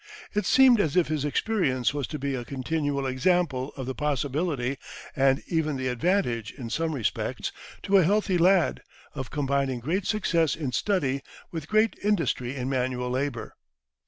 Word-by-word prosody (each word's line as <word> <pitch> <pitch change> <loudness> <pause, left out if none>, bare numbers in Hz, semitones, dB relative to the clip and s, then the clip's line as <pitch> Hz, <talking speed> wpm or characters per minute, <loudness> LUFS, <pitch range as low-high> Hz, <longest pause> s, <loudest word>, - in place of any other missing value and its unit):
It 210 - 0
seemed 255 -3 +6
as 155 -7 -1
if 175 - +3
his 155 -3 -1
experience 145 - +1
was 145 -4 -2
to 150 - -5
be 140 0 -2
a 125 -2 -3
continual 140 +2 -2
example 135 0 +1
of 130 - -4
the 130 - -3
possibility, 140 -1 -1 0.4
and 135 0 +3
even 155 -3 0
the 130 -1 -2
advantage 125 - 0
in 120 -5 -8
some 165 +1 -1
respects, 120 -6 -2 0.3
to 200 - +4
a 190 - +6
healthy 195 0 +2
lad, 180 0 +3 0.3
of 135 -4 -5
combining 140 -3 0
great 175 +10 -1
success 170 -8 +1
in 145 -5 -3
study 140 -5 0 0.3
with 160 -4 -5
great 215 +1 +3
industry 155 - 0
in 130 -2 -3
manual 125 -1 -1
labour. 130 -2 -3
145 Hz, 160 wpm, -26 LUFS, 130-175 Hz, 0.4 s, seemed